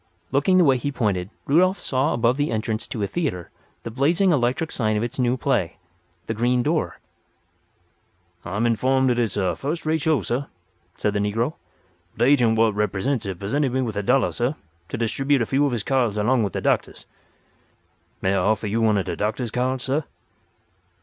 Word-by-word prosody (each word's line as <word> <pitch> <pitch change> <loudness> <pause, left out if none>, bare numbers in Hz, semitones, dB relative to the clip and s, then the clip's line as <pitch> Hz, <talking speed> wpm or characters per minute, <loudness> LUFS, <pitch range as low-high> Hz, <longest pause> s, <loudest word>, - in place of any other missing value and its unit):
Looking 145 +8 +3
the 180 - +6
way 135 -4 +4
he 145 +4 -3
pointed 100 -8 -1 0.2
Rudolf 185 +7 +3
saw 135 +3 0
above 120 +1 +2
the 145 +2 0
entrance 110 0 -2
to 110 - -4
a - - 0
theatre 135 - -3 0.3
the 115 - -5
blazing 165 - +2
electric 130 +2 0
sign 110 -3 0
of 105 - -1
its 120 +2 -5
new 125 0 +2
play, 90 -6 0 0.5
"The 115 - -2
Green 120 +2 +1
Door." 155 +3 -1 1.5
"I'm 100 +6 -2
informed 130 +3 +2
dat 120 -1 +1
it's 110 -4 -1
a 95 -2 0
fust 155 +5 -4
rate 160 0 +1
show, 150 -8 +1
sah," 130 +4 -2 0.5
said 105 - 0
the 105 - 0
negro. 115 +8 0 0.6
"De 120 - +3
agent 125 -5 +4
what 110 -1 +3
represents 105 +4 -1
it 95 -2 -4
pussented 125 +8 -1
me 130 - +1
with 110 -4 -4
a 105 - 0
dollar, 125 +6 +2
sah, 125 +4 -1 0.4
to - - -4
distribute 135 +4 +1
a - - -2
few 140 +5 +2
of - - -2
his 115 -4 -2
cards 120 -5 +1
along 120 +4 +2
with 100 - -1
de - - -2
doctah's. - - -1 1.2
May 95 - +2
I - - +2
offer 105 +3 +1
you 110 +3 0
one 110 -2 +3
of 95 - -1
de - - -3
doctah's 110 +2 -2
cards, 125 +1 -1
sah?" 140 +4 0
120 Hz, 195 wpm, -23 LUFS, 105-135 Hz, 1.5 s, the